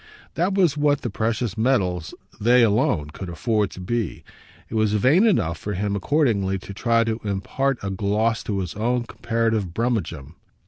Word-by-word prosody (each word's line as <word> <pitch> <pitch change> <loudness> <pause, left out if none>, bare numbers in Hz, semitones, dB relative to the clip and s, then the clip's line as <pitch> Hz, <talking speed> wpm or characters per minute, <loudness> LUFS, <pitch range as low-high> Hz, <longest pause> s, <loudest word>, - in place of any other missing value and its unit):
That 180 +4 0
was 175 -7 +3
what 145 -1 +2
the 120 - -3
precious 115 -1 -1
metals 95 -9 0 0.2
they 120 +3 +5
alone 100 - +1
could 95 +3 -7
afford 105 +4 0
to - - -11
be; 105 +1 -3 0.4
it - - -11
was 110 -2 +2
vain 140 - +4
enough 90 - +1
for 105 - -4
him 100 +2 -1
accordingly 100 -5 +1
to 95 +1 -9
try 115 +3 +2
to 115 0 -2
impart 115 +7 -1
a 100 - -2
gloss 105 +4 0
to 100 -2 -1
his 90 -3 -5
own 120 +3 0
comparative 115 -6 -1
brummagem. 90 - -2
110 Hz, 170 wpm, -23 LUFS, 95-120 Hz, 0.4 s, they